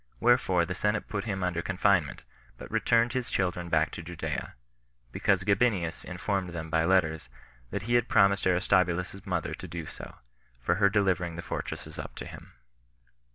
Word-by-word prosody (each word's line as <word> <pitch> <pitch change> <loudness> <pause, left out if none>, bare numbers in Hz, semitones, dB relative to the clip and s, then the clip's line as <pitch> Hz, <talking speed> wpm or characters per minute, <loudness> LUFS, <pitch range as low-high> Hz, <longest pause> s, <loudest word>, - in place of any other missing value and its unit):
Wherefore 115 -8 +3
the 90 - -3
senate 105 +3 0
put 100 -2 -3
him 95 -4 -2
under 90 -2 0
confinement, 95 -6 +1 0.3
but - - -10
returned 115 +1 +2
his 125 -2 -2
children 90 -2 -1
back 80 -1 +2
to - - -6
Judea, 80 -3 -5 0.6
because 95 +6 +1
Gabinius 100 -4 +1
informed 90 0 -2
them 80 -1 -5
by 80 -1 +2
letters 80 -6 +2 0.4
that - - -3
he 120 +3 -2
had 120 0 +3
promised 100 -1 +4
Aristobulus's 90 +1 +1
mother 90 - -1
to - - -7
do 85 -2 -6
so, - - -9 0.4
for 85 +9 0
her 100 - +6
delivering 95 -4 +1
the 85 - -6
fortresses - - -5
up - - -7
to - - -7
him. - - -11
90 Hz, 165 wpm, -29 LUFS, 85-100 Hz, 0.6 s, her